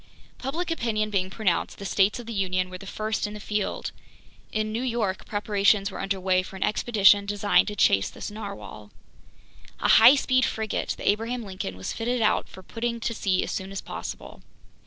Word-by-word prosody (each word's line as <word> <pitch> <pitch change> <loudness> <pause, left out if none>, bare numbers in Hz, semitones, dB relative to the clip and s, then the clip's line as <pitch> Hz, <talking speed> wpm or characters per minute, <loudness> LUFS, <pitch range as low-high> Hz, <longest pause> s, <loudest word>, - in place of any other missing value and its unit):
Public 330 +7 -3
opinion 215 -8 -1
being 190 -2 0
pronounced, 190 -4 -1
the 200 - -8
States 195 +3 +2
of 240 - -8
the 230 - -6
Union 185 -2 -1
were 185 - -7
the 195 - -10
first 215 +1 -2
in 210 - -8
the - - -7
field. 210 0 -2 0.6
In 215 0 -1
New 225 +2 -2
York 230 -7 -2
preparations 205 -1 +2
were - - -7
under 195 0 -2
way 185 0 +2
for 185 - -10
an 190 - -2
expedition 205 -2 +4
designed 205 0 +3
to 210 - -4
chase 95 - +3
this - - -7
narwhale. 200 - -8 0.9
A - - +1
high 235 +5 +9
speed 255 -2 +2
frigate, 220 -4 -2
the - - -6
Abraham 230 +4 0
Lincoln, 185 - -6
was 95 - -4
fitted 240 +2 -1
out - - +1
for 190 - -12
putting 235 +3 -3
to 230 - -2
sea 190 -4 0
as - - -4
soon 190 0 -4
as 195 - -4
possible. - - -7
205 Hz, 195 wpm, -26 LUFS, 190-225 Hz, 0.9 s, high